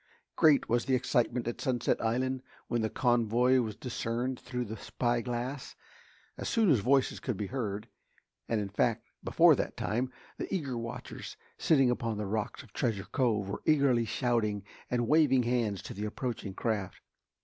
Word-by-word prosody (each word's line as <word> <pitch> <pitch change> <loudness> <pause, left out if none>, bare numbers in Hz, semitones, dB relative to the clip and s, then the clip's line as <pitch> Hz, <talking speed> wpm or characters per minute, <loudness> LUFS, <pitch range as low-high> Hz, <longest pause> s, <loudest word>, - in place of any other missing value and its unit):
Great 155 -3 +5
was 120 +1 +1
the 130 - +3
excitement 120 -1 +1
at 120 - -3
Sunset 120 -2 0
Island 130 +3 0 0.3
when 120 -1 0
the 110 - 0
convoy 120 +2 +3
was 110 -4 -2
discerned 125 +1 -3
through 125 0 -4
the 110 0 -6
spyglass. 120 +4 -2 0.6
As - - -3
soon 225 -8 +4
as 130 - +5
voices 130 +5 +2
could 125 -7 -3
be 105 - -2
heard, 105 -3 -3 0.6
and 115 - +1
in 100 -1 -3
fact 115 +3 0 0.2
before - - +6
that - - -3
time, 125 +4 -1 0.3
the - - -4
eager 145 -10 -1
watchers 115 0 -6 0.2
sitting 135 -5 +4
upon 115 -3 -2
the 105 - -2
rocks 105 +5 -3
of 110 -7 -19
Treasure 110 -6 -1
Cove 110 -7 +1
were 100 - -4
eagerly 140 -6 +4
shouting 110 -3 0 0.3
and 120 -1 0
waving 150 -4 +4
hands 115 -5 0
to - - -7
the 105 +2 -4
approaching 105 -3 -4
craft. 105 -5 -2
120 Hz, 165 wpm, -31 LUFS, 110-130 Hz, 0.6 s, before